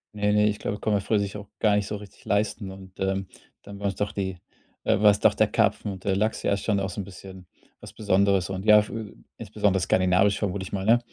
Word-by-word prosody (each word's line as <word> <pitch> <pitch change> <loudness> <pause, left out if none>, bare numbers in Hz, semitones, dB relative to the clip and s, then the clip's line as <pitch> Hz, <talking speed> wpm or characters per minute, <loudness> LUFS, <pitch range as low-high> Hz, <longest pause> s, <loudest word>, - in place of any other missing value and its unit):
Ne, 105 0 +1
ne, 105 0 +4
ich 105 0 -1
glaube, 105 - -3
konnte 110 - 0
man - - -2
früher 110 +3 +1
sich 100 0 -3
auch 105 -1 -10
gar 105 -2 +3
nicht 100 0 0
so - - -3
richtig 100 -2 -12
leisten 100 -1 -1
und, 95 -1 -13
ähm, 95 0 -1 0.4
dann 100 0 -10
war's 100 -1 -2
doch 105 +2 -2
die 95 -2 -3 0.5
äh, - - +2
war's 105 -1 +5
doch - - +5
der - - +2
Karpfen 105 - 0
und 95 - -11
der 95 -1 +1
Lachs, 110 +2 -1
ja, - - +1
ist 100 - -3
schon 105 -3 +1
auch 95 - -2
so 90 - -7
'n - - -5
bisschen 95 -1 -12 0.3
was - - -12
Besonderes 100 -3 +2
und 95 0 -4
ja, 105 -1 +7
fü 110 -2 -7 0.2
insbesondere 105 -3 0
skandinavisch 95 +2 +3
vermute 100 -2 -2
ich - - -9
mal, 95 -1 -2
ne? 115 +3 +5
100 Hz, 250 wpm, -25 LUFS, 95-105 Hz, 0.5 s, ja